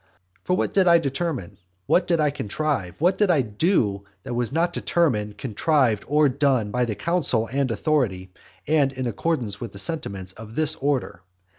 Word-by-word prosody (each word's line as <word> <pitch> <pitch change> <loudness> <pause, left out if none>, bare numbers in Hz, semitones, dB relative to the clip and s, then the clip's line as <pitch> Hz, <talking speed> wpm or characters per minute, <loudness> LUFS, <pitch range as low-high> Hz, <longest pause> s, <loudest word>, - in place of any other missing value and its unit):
For 180 - 0
what - - -1
did 190 -2 +3
I 170 0 +7
determine, 135 - -3 0.3
what 175 - +2
did 170 -2 +2
I 150 -2 +2
contrive, 135 - -3
what 180 +4 +2
did 210 -2 +3
I 155 -7 +3
do, 105 - 0 0.2
that 125 - -5
was 120 0 -1
not 170 +3 0
determined, 110 -14 0
contrived, 125 -2 +1
or 150 +1 +4
done, 130 -5 +1
by 125 +2 +1
the 110 -3 -3
counsel 150 - 0
and 140 -1 +1
authority 110 - -1 0.3
and 145 -3 +2
in 130 -1 -4
accordance 120 -4 -2
with 120 - -6
the - - -10
sentiments 100 - -2
of 110 +1 -11
this 155 -2 +3
order? 135 -10 -2
135 Hz, 175 wpm, -24 LUFS, 105-160 Hz, 0.3 s, I